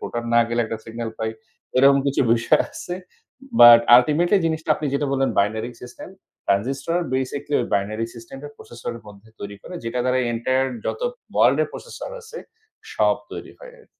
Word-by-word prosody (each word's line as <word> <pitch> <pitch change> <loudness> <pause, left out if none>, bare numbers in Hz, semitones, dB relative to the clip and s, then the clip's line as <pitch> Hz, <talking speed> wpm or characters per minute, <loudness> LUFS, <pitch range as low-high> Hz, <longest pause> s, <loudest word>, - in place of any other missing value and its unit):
Proton 120 0 -5
না 120 - +6
গেলে 120 0 0
একটা 110 0 -5
সিগনাল 115 0 -6
পাই। 110 0 -2 0.5
এরকম 140 +1 +6
কিছু 140 - +1
বিষয় 120 0 +3
আছে। 175 - -6 0.7
বাট 120 -1 +10 0.2
ultimately 170 +9 +3
জিনিসটা 160 -1 -2
আপনি 150 - -4
যেটা 145 +1 0
বললেন, 135 0 +1
binary 110 +4 0
system 125 +6 -10 0.4
ট্রানজিস্টর 135 - 0 0.2
basically 140 +3 -2
ঐ - - 0
binary 110 +3 -1
system 115 +3 -11
টা 145 - -7
processor 120 0 -8
এর - - -11
মধ্যে 105 +1 -15
তৈরি 100 0 -7
করে, 180 - -10
যেটা 115 +2 -3
দ্বারা 130 0 +1
entire 130 +3 0 0.2
যত - - -3 0.3
world - - +4
এর - - -1
processor 485 +1 -8
আছে, 460 +1 -10 0.5
সব - - +2 0.2
তৈরি - - -8
হয় - - -12
আর - - -22
125 Hz, 175 wpm, -22 LUFS, 115-145 Hz, 0.7 s, বাট